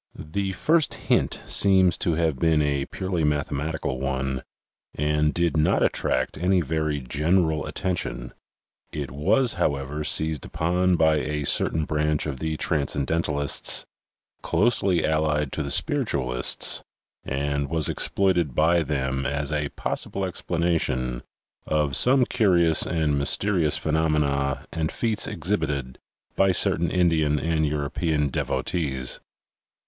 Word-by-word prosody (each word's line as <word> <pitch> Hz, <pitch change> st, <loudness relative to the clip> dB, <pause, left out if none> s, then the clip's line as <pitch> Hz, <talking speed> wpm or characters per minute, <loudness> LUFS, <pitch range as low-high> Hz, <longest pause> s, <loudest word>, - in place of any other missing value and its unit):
The 95 Hz, +5 st, -3 dB
first 160 Hz, -, +1 dB
hint -, -, 0 dB
seems 95 Hz, -3 st, +4 dB
to 85 Hz, -, +1 dB
have 80 Hz, -5 st, 0 dB
been 80 Hz, 0 st, +3 dB
a 70 Hz, -2 st, -1 dB
purely 95 Hz, -3 st, -3 dB
mathematical 75 Hz, -1 st, -2 dB
one 65 Hz, -1 st, -2 dB, 0.5 s
and 75 Hz, +1 st, +1 dB
did 85 Hz, 0 st, 0 dB
not 75 Hz, -1 st, +2 dB
attract 65 Hz, +2 st, 0 dB
any 90 Hz, +2 st, +2 dB
very 75 Hz, -1 st, -1 dB
general 80 Hz, +4 st, 0 dB
at -, -, -8 dB
tention. 90 Hz, -9 st, -3 dB, 0.6 s
It 70 Hz, -4 st, -5 dB
was, 105 Hz, -, +2 dB
however, 70 Hz, +1 st, -1 dB
seized 80 Hz, 0 st, 0 dB
upon 90 Hz, +3 st, 0 dB
by 80 Hz, -2 st, +3 dB
a 75 Hz, 0 st, -2 dB
certain 80 Hz, +2 st, +2 dB
branch 75 Hz, 0 st, 0 dB
of 70 Hz, -4 st, -4 dB
the 80 Hz, +1 st, -2 dB
transcendentalists, 75 Hz, 0 st, 0 dB, 0.6 s
closely 100 Hz, -6 st, +2 dB
allied 75 Hz, -2 st, 0 dB
to -, -, -3 dB
the 70 Hz, -, -4 dB
spiritualists, 70 Hz, -, 0 dB, 0.4 s
and 70 Hz, +1 st, -2 dB
was 80 Hz, -1 st, +1 dB
exploited 90 Hz, -8 st, +1 dB
by 85 Hz, +2 st, +3 dB
them 65 Hz, -3 st, -2 dB
as 70 Hz, +1 st, -2 dB
a 75 Hz, -2 st, -1 dB
possible 100 Hz, -, -3 dB
explanation 80 Hz, -9 st, -1 dB, 0.5 s
of 75 Hz, -3 st, 0 dB
some 130 Hz, 0 st, +5 dB
curious 90 Hz, -10 st, +3 dB
and 75 Hz, -4 st, 0 dB
mysterious 85 Hz, +2 st, +2 dB
phenomena 75 Hz, -3 st, 0 dB
and 80 Hz, -1 st, -2 dB
feats 115 Hz, -3 st, 0 dB
exhibited 75 Hz, -9 st, -2 dB, 0.4 s
by 95 Hz, -1 st, +3 dB
certain 85 Hz, -1 st, +3 dB
Indian 80 Hz, -5 st, +2 dB
and 80 Hz, -1 st, 0 dB
European 75 Hz, +1 st, -1 dB
devotees. 65 Hz, -2 st, -2 dB
75 Hz, 125 wpm, -24 LUFS, 70-85 Hz, 0.6 s, some